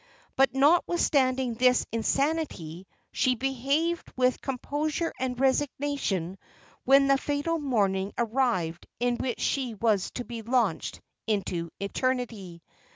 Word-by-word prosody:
But 270 Hz, 0 st, +3 dB
notwithstanding 270 Hz, -4 st, +3 dB
this 250 Hz, +2 st, +3 dB
insanity, 230 Hz, -, -1 dB, 0.2 s
she 255 Hz, -1 st, +2 dB
behaved 275 Hz, +7 st, -1 dB
with 255 Hz, 0 st, +2 dB
composure 295 Hz, +5 st, -2 dB
and 255 Hz, -1 st, -2 dB
resignation 265 Hz, -, 0 dB, 0.5 s
when 275 Hz, +1 st, +6 dB
the 275 Hz, 0 st, +3 dB
fatal 290 Hz, +4 st, -1 dB
morning 200 Hz, -8 st, 0 dB
arrived 225 Hz, -9 st, 0 dB
in 245 Hz, 0 st, +1 dB
which 250 Hz, -3 st, -3 dB
she 255 Hz, -5 st, -1 dB
was 215 Hz, -3 st, +1 dB
to 245 Hz, -, -4 dB
be 235 Hz, -1 st, -6 dB
launched 240 Hz, +2 st, 0 dB, 0.3 s
into 180 Hz, -5 st, -1 dB
eternity. 200 Hz, -5 st, -3 dB
255 Hz, 110 wpm, -27 LUFS, 215-275 Hz, 0.5 s, when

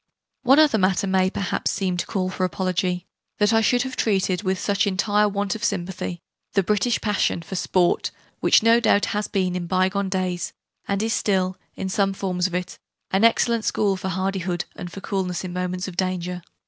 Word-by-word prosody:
One 270 Hz, +2 st, +5 dB
other 300 Hz, -8 st, +5 dB
matter 190 Hz, +1 st, +2 dB
may 190 Hz, -1 st, +2 dB
perhaps 195 Hz, -1 st, -2 dB
seem 185 Hz, -2 st, -1 dB
to -, -, -2 dB
call 185 Hz, -2 st, -1 dB
for 185 Hz, -, -3 dB
apology 180 Hz, -1 st, -1 dB, 0.3 s
that 210 Hz, +2 st, +3 dB
I 225 Hz, -, +5 dB
should 245 Hz, +2 st, +3 dB
have 260 Hz, -1 st, -5 dB
treated 190 Hz, -3 st, +1 dB
with 190 Hz, -2 st, 0 dB
such 200 Hz, +2 st, +1 dB
entire 205 Hz, +2 st, +2 dB
want 200 Hz, 0 st, -1 dB
of 225 Hz, -, -7 dB
sympathy 175 Hz, -3 st, -3 dB, 0.3 s
the 195 Hz, -, +3 dB
British 210 Hz, +5 st, +1 dB
passion 205 Hz, -5 st, 0 dB
for 190 Hz, -, -7 dB
'Sport', 180 Hz, -1 st, +1 dB, 0.3 s
which -, -, +4 dB
no 230 Hz, +1 st, +6 dB
doubt 205 Hz, -3 st, +3 dB
has 210 Hz, 0 st, -1 dB
been 185 Hz, -2 st, 0 dB
in 175 Hz, -1 st, -3 dB
by 185 Hz, +1 st, +2 dB
gone 200 Hz, 0 st, -2 dB
days, 185 Hz, -2 st, -2 dB, 0.3 s
and 200 Hz, +1 st, 0 dB
is 225 Hz, 0 st, 0 dB
still, 185 Hz, -2 st, +1 dB, 0.2 s
in 190 Hz, -, -4 dB
some 195 Hz, +1 st, +1 dB
forms 185 Hz, -2 st, -1 dB
of 180 Hz, -, -6 dB
it, 180 Hz, +1 st, -4 dB, 0.3 s
an 190 Hz, +3 st, +2 dB
excellent 230 Hz, 0 st, +3 dB
school 200 Hz, -2 st, +1 dB
for 190 Hz, 0 st, -4 dB
hardihood 185 Hz, -1 st, -2 dB
and 175 Hz, -, -7 dB
for 195 Hz, -, -8 dB
coolness 190 Hz, -4 st, -2 dB
in 180 Hz, -1 st, -5 dB
moments 180 Hz, +1 st, -3 dB
of 185 Hz, -, -7 dB
danger. 180 Hz, -1 st, -2 dB
190 Hz, 200 wpm, -23 LUFS, 180-205 Hz, 0.3 s, no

